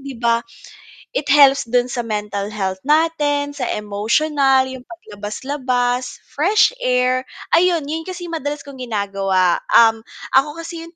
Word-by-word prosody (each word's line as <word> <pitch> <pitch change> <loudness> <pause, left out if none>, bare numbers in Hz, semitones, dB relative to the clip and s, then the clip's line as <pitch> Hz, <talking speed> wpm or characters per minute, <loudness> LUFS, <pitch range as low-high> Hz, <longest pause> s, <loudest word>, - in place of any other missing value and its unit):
'di 275 -1 -8
ba? 235 -1 +2 0.8
It 290 - -2
helps 275 -3 +5
do'n 245 0 +2
sa 240 -2 -2
mental 210 -2 -4
health 190 -3 -3
natin, 295 -2 +1
sa 255 -4 -3
emotional, 260 +6 +1
'yong 260 -1 -8
paglabas-labas, 250 -1 -3
fresh 360 - +3
air. 255 0 +1 0.3
Ayun, 340 -2 +3
'yon 320 +2 -3
kasi 360 -1 -6
'yong 335 - -4
madalas 290 0 -4
kong 275 -2 -12
ginagawa, 195 -6 0 0.2
um, 225 -1 +6 0.4
ako 290 +3 +3
kasi 330 0 -7
'yong 335 +1 -14
260 Hz, 140 wpm, -19 LUFS, 225-295 Hz, 0.8 s, um